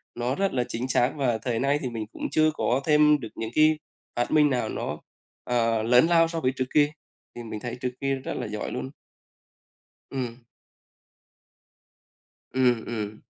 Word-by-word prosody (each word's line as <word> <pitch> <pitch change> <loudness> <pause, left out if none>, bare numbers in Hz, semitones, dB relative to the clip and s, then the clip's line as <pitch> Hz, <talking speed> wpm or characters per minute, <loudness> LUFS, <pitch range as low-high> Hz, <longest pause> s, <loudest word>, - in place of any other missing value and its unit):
nó 120 +3 -1
rất 195 0 0
là 125 -2 +1
chính 120 +3 -3
xác. 125 0 +2
Và 125 -6 +1
thời 115 0 -2
nay 140 +2 +2
thì 130 - -2
mình 115 -2 -4
cũng - - -5
chưa 155 0 +4
có 130 -3 0
thêm 150 -1 +5
được 115 -4 -7
những 110 0 -4
cái 155 0 +5 0.4
phát 120 - -1
minh 150 -1 +5
nào 120 -4 0
nó, - - -3 0.5
ờ, 115 -2 +1
lớn 125 +6 +5
lao 165 -1 +5
so 165 0 -3
với 130 -5 +1
trước 130 - -1
kia, 145 -1 +5 0.5
thì 120 - -7
mình 110 -2 -6
thấy 120 +1 -5
trước 125 - -1
kia 135 0 +1
rất 130 - -5
là - - -3
giỏi 105 0 -4
luôn. 130 +1 -4 1.2
Ừm. 125 -3 -5 2.1
Ừm, 125 -3 +2
ừm. 110 -2 -5
125 Hz, 180 wpm, -26 LUFS, 115-145 Hz, 2.1 s, thêm